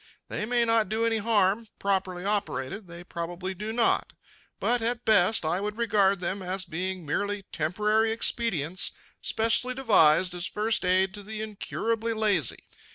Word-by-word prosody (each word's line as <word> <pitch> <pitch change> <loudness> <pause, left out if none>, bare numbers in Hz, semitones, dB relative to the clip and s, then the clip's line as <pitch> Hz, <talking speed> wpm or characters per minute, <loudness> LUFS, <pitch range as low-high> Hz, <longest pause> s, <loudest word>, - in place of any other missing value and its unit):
They 210 - -3
may 240 0 +2
not 225 -3 +2
do 225 +1 0
any 225 -1 +1
harm 215 0 +1
properly 190 -2 -1
operated, 195 - -2
they 170 0 -10
probably 175 +2 -5
do 210 +4 -5
not 230 0 +1 0.5
but, 245 0 +1
at 235 +1 -1
best, 215 -4 +4
I 175 +4 0
would 210 +1 -4
regard 200 -4 +2
them 185 +3 -2
as 185 +1 -3
being 180 +1 -4
merely 205 +6 -2
temporary 210 +8 +1
expedients 190 - +1 0.3
specially 230 +3 +1
devised 185 -8 +4
as 175 0 -3
first 215 0 -1
aid 185 +1 +3
to 205 - -8
the 215 +1 -6
incurably 225 +2 -2
lazy. 205 - 0
205 Hz, 155 wpm, -27 LUFS, 185-225 Hz, 0.5 s, best